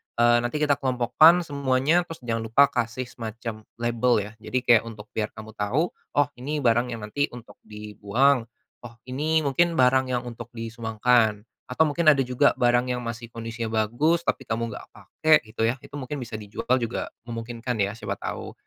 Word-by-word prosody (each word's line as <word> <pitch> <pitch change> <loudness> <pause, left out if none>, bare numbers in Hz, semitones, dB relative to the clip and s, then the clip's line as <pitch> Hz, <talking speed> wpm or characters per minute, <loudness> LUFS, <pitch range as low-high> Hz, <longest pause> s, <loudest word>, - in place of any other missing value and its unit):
eee, 120 0 +5
nanti 120 +4 -3
kita 145 -2 +2
kelompokkan 135 +7 +4
semuanya, 140 +2 +1
terus 165 -6 -10
jangan 115 -1 -1
lupa 140 +6 +5
kasih 120 +1 -2
semacam 115 -2 -7
label 120 +1 +1
ya. 105 - -9
Jadi, 120 +3 -3
kayak 120 -3 +5
untuk 105 -2 -10
biar 110 -1 -2
kamu 110 0 -9
tahu, 120 +11 -1 0.2
"Oh 145 0 +4
ini 145 +3 -3
barang 120 +1 +3
yang 110 - -9
nanti 140 +8 -1
untuk 120 -1 -13
dibuang. 105 +5 0 0.3
Oh 120 -1 -11
ini 155 +4 +1
mungkin 170 +5 +2
barang 130 0 +4
yang 120 - -2
untuk 120 -2 -8
disumbangkan." 115 -1 +1 0.3
Atau 125 +5 -1
mungkin 165 +3 -1
ada 140 -3 +5
juga 125 -1 +2
barang 120 +1 +2
yang 125 - -3
masih 115 0 -6
kondisinya 115 0 -5 0.2
bagus, 155 +10 +1
tapi 130 - -1
kamu 115 +1 -1
enggak - - -9
pakai, 155 +9 +3
gitu 110 +1 -2
ya, 115 - +2
itu - - -16
mungkin 145 +1 -5
bisa 115 -3 -6
dijual 105 +4 -1
juga 120 -1 -3 0.2
memungkinkan, 115 +1 -5
ya, 100 +3 -1
siapa 100 -3 -4
tahu. - - -5
120 Hz, 180 wpm, -25 LUFS, 115-135 Hz, 0.3 s, eee